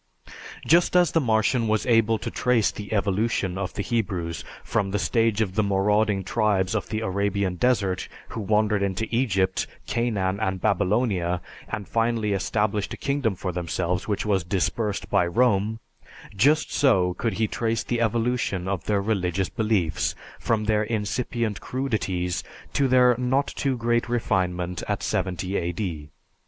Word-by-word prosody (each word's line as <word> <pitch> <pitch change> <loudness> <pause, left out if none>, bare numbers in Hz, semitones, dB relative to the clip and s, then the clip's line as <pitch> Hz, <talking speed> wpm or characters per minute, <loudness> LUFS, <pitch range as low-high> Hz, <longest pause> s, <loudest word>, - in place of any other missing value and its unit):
Just 170 +3 +4
as 175 -4 +5
the 165 - +2
Martian 115 0 +2
was 110 0 +1
able 115 -2 +3
to - - -5
trace 120 -4 +2
the 105 -1 -8
evolution 100 -2 0
of 95 -1 -4
the 100 - -2
Hebrews 90 -7 -2 0.2
from 100 -4 0
the 100 - -1
stage 115 0 +1
of 95 -4 -1
the 110 - +2
marauding 100 0 +2
tribes 100 -2 +1
of 110 - -2
the 110 0 -2
Arabian 100 -1 0
desert 100 -2 +1 0.2
who 115 - -5
wandered 105 0 +2
into 100 +2 -1
Egypt, 95 -7 +1 0.2
Canaan, 100 -5 -1
and 95 -3 -1
Babylonia, 95 -2 +1 0.3
and 100 - -4
finally 115 -2 0
established 105 +1 -1
a - - -17
kingdom 140 -7 0
for 90 +1 -3
themselves 90 +1 -2
which 105 0 -1
was 100 -4 +1
dispersed 100 +4 -1
by 90 - +3
Rome; 110 +1 +2 0.6
just 145 +10 +3
so 95 -11 +3
could 115 +3 -2
he 110 +4 +1
trace 115 +1 -1
the 120 -1 -1
evolution 115 -4 0
of 95 -3 -2
their 100 -2 +1
religious 95 -3 0
beliefs 105 -9 0 0.2
from 110 -2 0
their 105 0 +2
incipient 110 0 -2
crudities 100 -9 -2 0.3
to 140 - +2
their 125 -1 +5
not 130 +3 +2
too 135 -2 -2
great 120 0 0
refinement 90 -6 -1
at - - -2
70 95 +1 -1
A.D. 85 -4 -3
105 Hz, 150 wpm, -25 LUFS, 95-115 Hz, 0.6 s, as